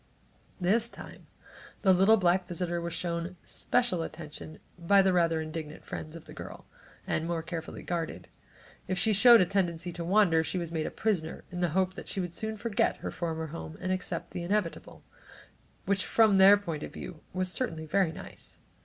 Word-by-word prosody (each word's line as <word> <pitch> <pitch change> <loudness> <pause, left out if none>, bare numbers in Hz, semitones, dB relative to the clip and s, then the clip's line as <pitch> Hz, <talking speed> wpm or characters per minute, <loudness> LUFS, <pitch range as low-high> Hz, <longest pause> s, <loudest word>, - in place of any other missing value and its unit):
This 215 +6 +3
time - - -12 0.6
the 190 -2 +6
little 195 +5 +6
black 180 -1 +2
visitor 175 -1 -2
was 170 0 -4
shown 170 +1 -3
special 240 -8 0
attention 155 -1 -8 0.2
by 195 +3 +5
the 190 -1 +3
rather 165 -2 +2
indignant 155 -1 -7
friends 155 +1 -7
of 165 - -10
the - - -12
girl, - - -9 0.4
and 160 - -1
more 170 -1 -2
carefully 165 -1 -6
guarded. 170 -2 -4 0.6
If 185 - -1
she 215 +4 +3
showed 230 +2 +8
a - - +4
tendency 175 -2 -1
to 170 0 -5
wander, 175 -3 +4
she 185 - -3
was 170 -2 -3
made 160 -2 -1
a - - -2
prisoner 180 -8 -2
in 175 - -5
the 175 -1 +1
hope 185 -1 +2
that - - -9
she - - -2
would 175 -2 -3
soon 220 +4 -3
forget 225 0 0
her - - -5
former 160 -2 -3
home 160 -1 -7
and 185 0 -2
accept 185 0 -3
the 175 - -4
inevitable, 180 0 -2 0.8
which 195 -1 +1
from 215 -4 +4
their 195 +2 +9
point 165 -7 -5
of - - -6
view, 165 -4 -8
was 185 0 -1
certainly 165 -10 -3
very 180 +1 +2
nice. - - -11
175 Hz, 190 wpm, -29 LUFS, 165-195 Hz, 0.8 s, their